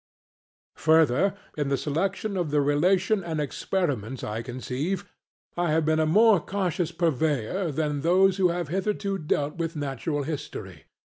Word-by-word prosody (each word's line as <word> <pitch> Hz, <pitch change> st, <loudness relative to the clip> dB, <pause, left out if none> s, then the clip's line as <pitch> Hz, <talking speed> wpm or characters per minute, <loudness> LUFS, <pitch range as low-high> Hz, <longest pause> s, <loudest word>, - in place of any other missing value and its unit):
Further, 160 Hz, +4 st, +3 dB, 0.2 s
in 145 Hz, -2 st, -1 dB
the 140 Hz, -, +1 dB
selection 190 Hz, +8 st, -2 dB
of 175 Hz, -4 st, -1 dB
the 145 Hz, 0 st, +2 dB
relation 180 Hz, +8 st, +2 dB
and 160 Hz, -2 st, -3 dB
experiments 140 Hz, -, -2 dB
I 110 Hz, +2 st, -3 dB
conceive 135 Hz, +10 st, -3 dB, 0.5 s
I 175 Hz, -1 st, 0 dB
have 155 Hz, 0 st, +2 dB
been 155 Hz, 0 st, +2 dB
a 155 Hz, -, +2 dB
more 215 Hz, +4 st, +5 dB
cautious 180 Hz, -2 st, -2 dB
purveyor 160 Hz, -, 0 dB
than 150 Hz, -1 st, -1 dB
those 185 Hz, +4 st, +4 dB
who 190 Hz, -2 st, +4 dB
have 170 Hz, -3 st, -2 dB
hitherto 195 Hz, +2 st, -1 dB
dealt 150 Hz, -1 st, -1 dB
with 165 Hz, 0 st, -3 dB
natural 145 Hz, +1 st, -2 dB
history. 150 Hz, 0 st, -6 dB
160 Hz, 145 wpm, -26 LUFS, 145-185 Hz, 0.5 s, more